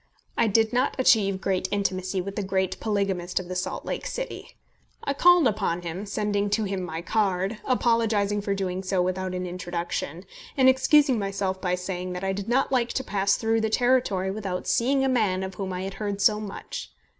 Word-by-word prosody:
I 230 Hz, -, +3 dB
did 220 Hz, +2 st, +2 dB
not 250 Hz, +2 st, +1 dB
achieve 205 Hz, -7 st, +4 dB
great 190 Hz, -1 st, 0 dB
intimacy 185 Hz, -2 st, -1 dB
with 195 Hz, +2 st, -6 dB
the 210 Hz, -, -1 dB
great 190 Hz, -1 st, -1 dB
polygamist 195 Hz, -5 st, -1 dB
of 185 Hz, -1 st, -8 dB
the 185 Hz, -, -4 dB
Salt 185 Hz, -, -3 dB
Lake -, -, -3 dB
City. -, -, -6 dB, 0.5 s
I 280 Hz, -, 0 dB
called 350 Hz, 0 st, +6 dB
upon 195 Hz, -6 st, -1 dB
him, 175 Hz, +5 st, -5 dB
sending 205 Hz, 0 st, 0 dB
to 210 Hz, +2 st, +1 dB
him 195 Hz, -2 st, -2 dB
my 165 Hz, -1 st, -5 dB
card, 195 Hz, +1 st, 0 dB
apologising 225 Hz, -5 st, +2 dB
for 200 Hz, -1 st, -1 dB
doing 190 Hz, -1 st, -2 dB
so 190 Hz, 0 st, -1 dB
without 185 Hz, +1 st, -1 dB
an 180 Hz, 0 st, -3 dB
introduction, 175 Hz, -2 st, -4 dB, 0.3 s
and 260 Hz, -1 st, +5 dB
excusing 260 Hz, -1 st, +5 dB
myself 195 Hz, -1 st, -2 dB
by 180 Hz, -1 st, +1 dB
saying 180 Hz, 0 st, -4 dB
that 180 Hz, +1 st, -5 dB
I 195 Hz, 0 st, 0 dB
did 200 Hz, +2 st, -5 dB
not 265 Hz, +3 st, +2 dB
like 245 Hz, -2 st, +2 dB
to 265 Hz, -, -1 dB
pass 200 Hz, -3 st, +1 dB
through 225 Hz, 0 st, +1 dB
the 220 Hz, -, 0 dB
territory 220 Hz, -6 st, +2 dB
without 195 Hz, -3 st, -4 dB
seeing 270 Hz, +3 st, +2 dB
a -, -, +2 dB
man 210 Hz, -8 st, +1 dB
of 190 Hz, 0 st, -5 dB
whom 190 Hz, -1 st, -4 dB
I 180 Hz, 0 st, -3 dB
had 195 Hz, 0 st, -4 dB
heard 205 Hz, -1 st, -3 dB
so 210 Hz, +1 st, +4 dB
much. 210 Hz, -2 st, -7 dB
200 Hz, 200 wpm, -26 LUFS, 185-225 Hz, 0.5 s, called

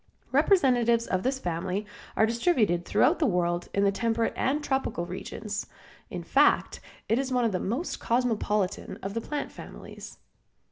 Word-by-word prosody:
Representatives 245 Hz, -, +3 dB
of 185 Hz, -4 st, -1 dB
this 260 Hz, +4 st, 0 dB
family 180 Hz, 0 st, -3 dB, 0.3 s
are 220 Hz, -, +5 dB
distributed 220 Hz, -, +1 dB
throughout 250 Hz, +11 st, +3 dB
the 310 Hz, -, +3 dB
world 175 Hz, -3 st, 0 dB
in 200 Hz, -, +1 dB
the 200 Hz, -, +4 dB
temperate 230 Hz, +2 st, 0 dB
and 290 Hz, +3 st, 0 dB
tropical 265 Hz, -11 st, -1 dB
regions. 205 Hz, +3 st, -5 dB, 0.4 s
In -, -, -5 dB
fact, -, -, +3 dB, 0.3 s
it 225 Hz, -, +2 dB
is 265 Hz, -1 st, -2 dB
one 250 Hz, -2 st, +2 dB
of 225 Hz, -, +1 dB
the 185 Hz, -, -1 dB
most 250 Hz, -, -3 dB
cosmopolitan 215 Hz, -5 st, 0 dB
of 195 Hz, +1 st, -4 dB
the 230 Hz, -, -2 dB
plant 295 Hz, +4 st, -4 dB
families. -, -, -10 dB
225 Hz, 155 wpm, -27 LUFS, 195-255 Hz, 0.4 s, are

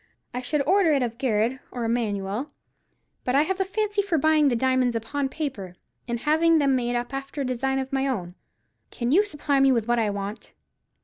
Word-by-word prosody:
I 250 Hz, -, -3 dB
should 285 Hz, +3 st, 0 dB
order 370 Hz, 0 st, +4 dB
it 275 Hz, -3 st, +2 dB
of 235 Hz, 0 st, -4 dB
Garrard 240 Hz, 0 st, +1 dB
or 245 Hz, -, -5 dB
Emanuel; 225 Hz, +1 st, -1 dB, 0.7 s
but 250 Hz, -, 0 dB
I 285 Hz, -, +5 dB
have 380 Hz, +4 st, -2 dB
a 385 Hz, -, +2 dB
fancy 415 Hz, +1 st, 0 dB
for 390 Hz, -5 st, 0 dB
buying 310 Hz, 0 st, +4 dB
the 245 Hz, -, +1 dB
diamonds 255 Hz, 0 st, +1 dB
upon 270 Hz, +5 st, -2 dB
paper, 255 Hz, -, -5 dB, 0.3 s
and 235 Hz, -1 st, -3 dB
having 320 Hz, +3 st, +3 dB
them 280 Hz, -3 st, +3 dB
made 245 Hz, -1 st, -1 dB
up 240 Hz, +2 st, -3 dB
after 275 Hz, +1 st, -4 dB
a -, -, -1 dB
design 260 Hz, +2 st, -1 dB
of 265 Hz, 0 st, -4 dB
my 270 Hz, 0 st, +1 dB
own. 185 Hz, -10 st, -3 dB, 0.6 s
Can 240 Hz, 0 st, -2 dB
you 380 Hz, +8 st, +5 dB
supply 295 Hz, -7 st, -1 dB
me 270 Hz, 0 st, +5 dB
with 230 Hz, -3 st, +1 dB
what 240 Hz, 0 st, +2 dB
I 220 Hz, -2 st, +1 dB
want?" 200 Hz, +1 st, -6 dB
265 Hz, 205 wpm, -25 LUFS, 235-295 Hz, 0.7 s, I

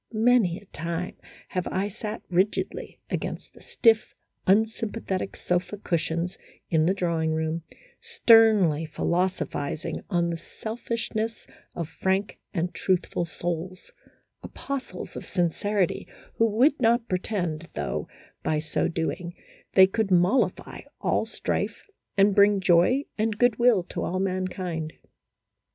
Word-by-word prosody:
Many 220 Hz, -5 st, +3 dB
a 205 Hz, -, -14 dB
time 170 Hz, 0 st, -4 dB, 0.3 s
have 180 Hz, -1 st, -2 dB
I 195 Hz, +2 st, -1 dB
sat 215 Hz, +1 st, -6 dB
rigidly 185 Hz, +4 st, -1 dB
against -, -, -4 dB
the -, -, -17 dB
stiff, 225 Hz, -2 st, +2 dB, 0.3 s
unsympathetic 215 Hz, -1 st, 0 dB
sofa 180 Hz, +3 st, -1 dB
cushions 170 Hz, -1 st, -2 dB, 0.3 s
in 160 Hz, -1 st, +3 dB
the 190 Hz, -, +2 dB
drawing 165 Hz, -3 st, 0 dB
room, 160 Hz, +1 st, -1 dB, 0.4 s
sternly 225 Hz, -, +5 dB
philosophizing 170 Hz, -2 st, -1 dB
on 170 Hz, -3 st, +1 dB
the 165 Hz, -, -4 dB
selfishness 225 Hz, +1 st, -4 dB, 0.3 s
of 170 Hz, -3 st, -3 dB
frank 190 Hz, +5 st, -1 dB
and 175 Hz, -1 st, -2 dB
truthful 180 Hz, -2 st, 0 dB
souls: 175 Hz, +2 st, -5 dB, 0.5 s
apostles 275 Hz, -1 st, -6 dB
of -, -, -5 dB
sincerity, 185 Hz, +2 st, 0 dB, 0.3 s
who 230 Hz, -, +5 dB
would 255 Hz, +8 st, +3 dB
not 235 Hz, 0 st, +3 dB
pretend, 175 Hz, -4 st, -2 dB
though, 75 Hz, -3 st, -2 dB, 0.3 s
by 155 Hz, -, 0 dB
so 155 Hz, 0 st, 0 dB
doing, 170 Hz, +1 st, -3 dB, 0.4 s
they 190 Hz, -, +9 dB
could 200 Hz, +2 st, -1 dB
mollify 180 Hz, +8 st, +2 dB, 0.2 s
all -, -, +1 dB
strife -, -, -3 dB, 0.3 s
and 200 Hz, +1 st, +5 dB
bring 200 Hz, 0 st, +5 dB
joy 185 Hz, +9 st, +4 dB, 0.2 s
and 215 Hz, -1 st, 0 dB
good 245 Hz, -2 st, +3 dB
will 235 Hz, -6 st, +5 dB
to -, -, -5 dB
all 185 Hz, -, -1 dB
mankind. 185 Hz, -4 st, -2 dB
185 Hz, 120 wpm, -26 LUFS, 170-220 Hz, 0.5 s, they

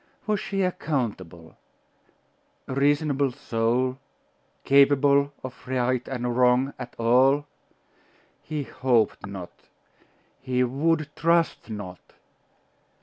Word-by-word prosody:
Was 210 Hz, -2 st, 0 dB
she 195 Hz, -1 st, -2 dB
accountable? 105 Hz, -, -3 dB, 1.1 s
A -, -, -4 dB
reasonable 140 Hz, 0 st, +1 dB
soul, 125 Hz, 0 st, -1 dB, 0.6 s
capable 140 Hz, 0 st, +4 dB
of 130 Hz, 0 st, -9 dB
right 125 Hz, -1 st, -1 dB
or 135 Hz, -, -3 dB
wrong 125 Hz, +2 st, +2 dB
at 125 Hz, -1 st, -8 dB
all? 130 Hz, +5 st, +3 dB, 1.0 s
He 150 Hz, -1 st, -4 dB
hoped 120 Hz, -6 st, 0 dB
not.... 95 Hz, -3 st, -8 dB, 0.9 s
He 125 Hz, 0 st, 0 dB
would 150 Hz, +5 st, 0 dB
trust 165 Hz, -4 st, +1 dB
not.... 100 Hz, -4 st, -8 dB
130 Hz, 90 wpm, -25 LUFS, 120-145 Hz, 1.1 s, capable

